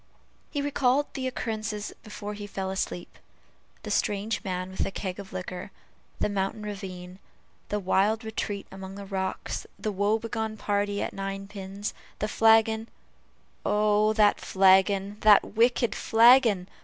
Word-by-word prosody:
He 285 -2 -2
recalled 280 0 +1
the 260 -1 -3
occurrences 220 -4 -4
before 210 0 -7
he 205 0 -7
fell 190 -1 -4
asleep. 180 -2 -4 0.6
The - - -5
strange 205 +1 0
man 185 -1 -3
with 190 - -1
the - - -2
keg 190 -1 -5
of 195 -1 -9
liquor 185 +1 -6 0.5
the - - +1
mountain 200 +1 -2
ravine 185 -3 -7 0.5
the 210 - 0
wild 205 +4 +2
retreat 215 -2 -4
among 190 0 -8
the 200 0 -8
rocks 190 -1 -3
the 210 +2 -2
woe 205 +2 +1
begone 220 -1 -4
party 205 -1 -1
at - - -4
ninepins 195 +1 -5 0.2
the 210 - -1
flagon 225 0 +4 0.7
"Oh! 210 0 +3
that 210 -1 +4
flagon! 195 +1 +3
that 210 -1 +7
wicked 240 +1 +3
flagon!" 230 -5 +5
205 Hz, 140 wpm, -27 LUFS, 195-220 Hz, 0.7 s, that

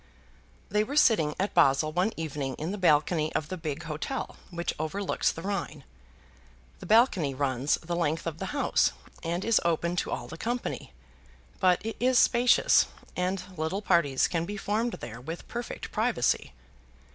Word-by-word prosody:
They 210 +2 +2
were 275 +7 -5
sitting 185 - +4
at 195 +2 -1
Basle 155 -2 +4
one 180 +7 +1
evening 145 -5 -3
in 160 +4 -4
the 205 - -4
balcony 155 -1 +3
of 155 - -1
the 185 - -3
big 160 -2 -5
hotel 165 - -4
which 170 -1 -3
overlooks 185 +6 0
the 165 - -8
Rhine. 190 -7 -3 1.0
The - - -9
balcony 210 - +4
runs 135 0 +1
the 170 +1 -5
length 165 -1 -1
of 165 -1 -4
the - - -3
house, 290 -1 +1 0.3
and 170 +2 -2
is 230 -1 +3
open 170 +1 0
to - - -1
all - - -4
the 165 - -9
company; 240 +1 -3 0.7
but 185 +1 +3
it 225 - -4
is 255 +1 +3
spacious, 245 +1 +5 0.3
and 185 +1 -1
little 165 +6 -2
parties 170 -9 +3
can 165 -2 -1
be 205 +4 -5
formed 220 +4 -1
there 115 +1 -8
with 160 +6 -7
perfect 240 0 -6
privacy. 65 - 0
170 Hz, 165 wpm, -28 LUFS, 155-205 Hz, 1.0 s, spacious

